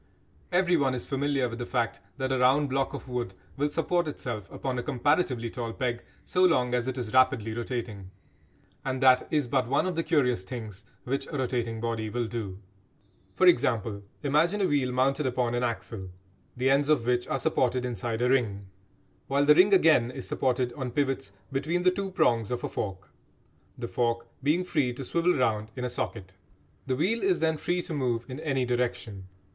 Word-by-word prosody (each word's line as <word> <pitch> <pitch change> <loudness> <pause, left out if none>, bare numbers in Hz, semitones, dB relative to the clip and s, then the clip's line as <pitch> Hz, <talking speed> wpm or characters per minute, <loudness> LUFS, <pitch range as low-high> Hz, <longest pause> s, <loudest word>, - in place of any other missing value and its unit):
Everyone 175 -7 +3
is 125 - -5
familiar 140 -1 0
with 115 0 -7
the 120 - -3
fact 115 -2 -1 0.2
that 130 -1 -2
a 130 - +1
round 135 +3 +4
block 135 0 0
of - - -8
wood 120 -6 -3 0.2
will 145 +1 0
support 170 +2 0
itself 115 -8 -5
upon 130 -2 -3
a - - -1
comparatively 130 -3 0
tall 115 -3 -4
peg 120 -2 -2 0.2
so 185 - +2
long 125 -9 +3
as 125 0 0
it 130 0 -3
is 115 -4 -4
rapidly 130 -4 +3
rotating. 115 -5 -4 0.7
And 130 -1 -2
that 130 -1 +5
is 150 -5 +1
but 130 -1 +1
one 140 +6 +2
of 185 -2 -1
the 165 - +1
curious 140 - +2
things 105 -2 -7 0.2
which 135 +2 -2
a 145 - -4
rotating 120 -3 -1
body 115 -1 -2
will 120 +2 -1
do. 110 -5 -5 0.8
For 185 - +3
example, 115 - +3 0.2
imagine 160 +8 +2
a - - +3
wheel 140 -6 +1
mounted 135 +3 +1
upon 125 -1 0
an 120 - 0
axle 115 -5 -3 0.5
the 130 +2 +2
ends 140 +2 +3
of 140 -7 +3
which 125 0 +1
are - - 0
supported 125 -1 +1
inside 120 0 -2
a 125 - +3
ring, 105 -7 +1 0.6
while 140 +1 +2
the 150 - +8
ring 185 +6 +5
again 160 -10 +5
is 125 - -7
supported 125 -1 0
on 130 -4 -4
pivots 135 -3 -1 0.2
between 160 +6 -1
the 185 - +5
two 195 +1 -3
prongs 115 - +2
of 125 0 -3
a - - 0
fork, 95 -2 -5 0.7
the - - -4
fork 115 +4 0 0.2
being 155 +6 +2
free 150 -9 0
to 135 - -6
swivel 170 +6 +1
round 110 -4 0
in 125 -1 -3
a - - -1
socket. 105 -5 -4 0.5
The 130 - +1
wheel 195 - +1
is 190 -2 +2
then 160 -1 +1
free 175 +3 -1
to 165 - -6
move 120 -5 -1
in 130 +1 -7
any 135 -5 0
direction. 120 -5 -2
130 Hz, 195 wpm, -28 LUFS, 120-145 Hz, 0.8 s, the